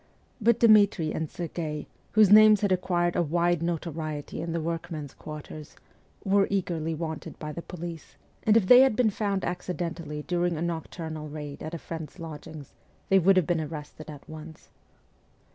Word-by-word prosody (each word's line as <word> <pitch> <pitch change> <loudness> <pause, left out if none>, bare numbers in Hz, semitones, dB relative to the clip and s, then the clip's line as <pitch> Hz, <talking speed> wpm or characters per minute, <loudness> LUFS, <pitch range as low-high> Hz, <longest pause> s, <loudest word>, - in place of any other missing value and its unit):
But 235 +1 +3
Dmitri 205 -8 +5
and 160 - -2
Serghei, 160 -3 -5 0.3
whose 215 -2 +6
names 215 -1 +8
had 205 -2 +1
acquired 175 -1 +1
a - - +2
wide 170 +1 +1
notoriety 160 -3 -4
in 165 - -4
the 165 - -1
workmen's 160 -3 -4
quarters, 155 0 -9 0.5
were 195 0 +3
eagerly 170 -5 -1
wanted 160 0 -6
by 150 -1 -6
the 170 - -6
police; 170 -2 -8 0.3
and 215 +1 +4
if 215 - +2
they 250 +6 +9
had 265 -5 +4
been 235 -3 +3
found 200 -2 -1
accidentally 170 -4 -4
during 175 -1 0
a - - -4
nocturnal 160 -2 -5
raid 145 -1 -7
at 160 +2 -5
a - - -3
friend's 160 +1 -8
lodgings 155 -3 -9 0.4
they 195 - +6
would 190 +2 +4
have 180 - +4
been 170 -1 0
arrested 155 0 -8
at 145 -2 -11
once. 155 0 -11
170 Hz, 165 wpm, -27 LUFS, 155-185 Hz, 0.5 s, they